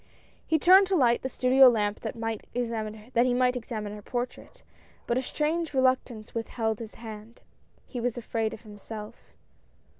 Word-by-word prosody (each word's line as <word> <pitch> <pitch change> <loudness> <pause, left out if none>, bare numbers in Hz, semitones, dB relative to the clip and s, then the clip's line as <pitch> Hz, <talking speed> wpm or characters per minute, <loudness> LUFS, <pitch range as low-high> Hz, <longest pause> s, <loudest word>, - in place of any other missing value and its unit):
He 320 - +3
turned 375 +5 +7
to 385 - +1
light 240 -7 +3
the 260 - -3
studio 255 +1 +6
lamp 210 -3 0
that 220 - -5
he - - -11 1.2
might 250 0 +2
examine 215 -3 -5
her 210 - -9
portrait, 245 +3 -5 0.4
but 235 - 0
a 255 - +1
strange 305 +3 -2
reluctance 255 -4 +1
withheld 225 -1 -2
his 225 -2 -8
hand. 220 0 -10 0.4
He 245 - -6
was 245 0 -1
afraid 225 -1 -2
of 220 - -9
himself. 215 +1 -10
240 Hz, 150 wpm, -27 LUFS, 220-260 Hz, 1.2 s, turned